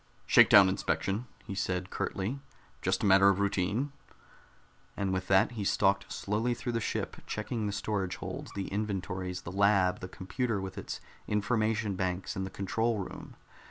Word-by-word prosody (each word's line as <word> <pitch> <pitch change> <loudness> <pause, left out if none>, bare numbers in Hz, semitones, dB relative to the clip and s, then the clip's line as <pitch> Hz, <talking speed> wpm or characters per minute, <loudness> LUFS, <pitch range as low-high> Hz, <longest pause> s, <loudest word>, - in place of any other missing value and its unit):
"Shakedown 115 -5 +8
inspection," 95 +5 -1 0.2
he 100 - -5
said 90 -1 -2
curtly. 105 +9 -2 0.4
"Just 95 +2 0
a - - +3
matter 95 0 +7
of 100 0 +2
routine." 100 +7 0 1.1
And 95 -1 0
with 95 0 -2
that 95 +4 +4
he 110 -4 -4
stalked - - +2
slowly 110 +4 -1
through 120 - -3
the 115 - 0
ship, - - -3
checking 110 0 -2
the - - -1
storage 100 -2 -2
holds, - - -6
the 100 -1 -3
inventories, 95 -3 -3
the 85 - -6
lab, 95 -1 +3
the 90 - -6
computer 105 +4 -2
with 95 -1 -5
its - - -6 0.3
information 110 0 +1
banks, 90 0 -2
and 95 0 -2
the - - -7
control 110 +4 -1
room. 100 - -7
100 Hz, 160 wpm, -30 LUFS, 95-110 Hz, 1.1 s, Shakedown